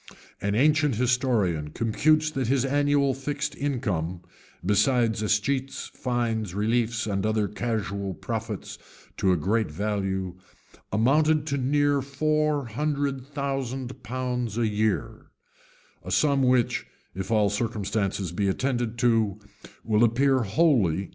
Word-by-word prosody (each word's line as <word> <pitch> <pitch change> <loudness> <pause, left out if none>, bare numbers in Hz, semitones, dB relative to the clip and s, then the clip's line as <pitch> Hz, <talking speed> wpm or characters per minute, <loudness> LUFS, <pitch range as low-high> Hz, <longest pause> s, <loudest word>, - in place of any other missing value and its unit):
An 100 0 0
ancient 150 +1 +3
historian 115 - +1
computes 155 - +2
that 135 -5 -2
his 135 +1 +2
annual 145 0 +2
fixed 145 +3 -3
income, 100 - -2 0.4
besides 110 +3 +2
escheats, 125 +6 -1
fines, 115 -6 -2
reliefs, 115 +2 0
and 100 -3 -1
other 110 -1 +1
casual 100 -4 -3
profits - - -5 0.4
to 95 - +2
a 90 - +3
great 105 +7 0
value, 95 0 -2 0.5
amounted 150 +8 +3
to 140 - -1
near 145 +2 +2
four 150 +1 0
hundred 140 +2 -2
thousand 135 -3 -4
pounds 125 -2 -3
a 115 -1 +2
year;[] 105 0 -1 0.8
a - - -8
sum 140 -2 +3
which, 125 -2 +2 0.3
if 95 +1 -5
all 105 -3 +3
circumstances 100 -4 -2
be 100 +3 -1
attended 120 +2 -1
to, 115 -4 +2 0.5
will 110 0 +2
appear 130 +4 +3
wholly 120 - +3
incredible. 95 +2 -4
120 Hz, 120 wpm, -26 LUFS, 105-135 Hz, 0.8 s, ancient